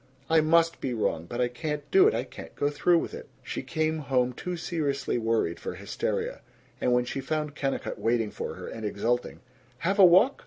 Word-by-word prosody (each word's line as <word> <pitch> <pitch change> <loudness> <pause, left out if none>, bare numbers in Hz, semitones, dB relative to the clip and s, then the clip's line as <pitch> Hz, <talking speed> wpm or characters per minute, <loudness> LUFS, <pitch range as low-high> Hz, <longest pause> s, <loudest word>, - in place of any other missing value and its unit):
I 160 -1 +6
must 165 +1 +3
be 125 -3 -2
wrong. 85 -7 -1
But 120 +4 -3
I 125 - +3
can't 150 +4 -4
do 385 +1 +7
it. 440 - +2
I - - 0
can't - - -11
go 145 - 0
through 170 +4 +3
with - - -2
it." - - -8 0.2
She - - -4
came 155 0 -1
home 130 -3 +1
too 180 +7 -5
seriously 140 -7 -1
worried 110 -7 0
for - - -5
hysteria; - - -3 0.4
and 125 - +2
when 125 0 +3
she 135 - -4
found 150 +1 -2
Kennicott 135 -2 -3
waiting 115 -2 +1
for - - -5
her, - - -8
and 110 - -7
exulting, 115 +4 -1 0.4
"Have 190 +9 -1
a 195 - +10
walk? 185 +10 +5
140 Hz, 205 wpm, -27 LUFS, 120-165 Hz, 0.4 s, a